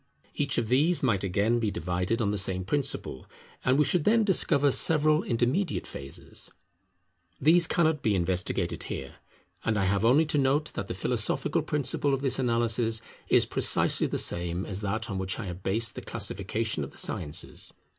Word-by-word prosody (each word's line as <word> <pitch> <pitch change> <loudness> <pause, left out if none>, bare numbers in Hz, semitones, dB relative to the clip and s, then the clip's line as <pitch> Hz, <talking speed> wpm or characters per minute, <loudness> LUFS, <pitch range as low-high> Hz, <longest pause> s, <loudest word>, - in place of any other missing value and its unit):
Each - - -1
of 115 - 0
these 150 +9 +2
might 105 -7 +1
again 100 +5 +1
be 110 -2 0
divided 90 +5 -2
on 100 - +1
the 105 - -1
same 95 -1 -2
principle, 115 - -2 0.4
and 130 +1 +3
we 150 - +4
should 175 +3 +1
then 225 +4 +4
discover 145 -8 +4
several 155 +1 +4
intermediate 125 +10 0
phases. 70 0 -8 0.9
These 165 +4 +4
cannot 160 -4 +1
be 105 -2 +1
investigated 90 0 -1
here; - - -6 0.5
and 115 -1 0
I 100 - +1
have 100 +2 +1
only 135 +8 +5
to 150 -1 0
note 140 +3 +1
that - - -4
the - - -4
philosophical - - -1
principle 145 -1 0
of 135 - -6
this 135 -2 +1
analysis 115 -2 0 0.2
is - - +4
precisely - - +2
the - - -2
same 85 +1 -1
as 100 -1 -5
that 110 +2 -2
on 95 -3 -4
which 95 0 -3
I 115 - -5
have 90 0 -7
based 110 +4 -1
the - - -7
Classification 105 -2 -2
of 70 - -6
the - - -15
Sciences. 75 +2 -2
115 Hz, 175 wpm, -28 LUFS, 95-145 Hz, 0.9 s, only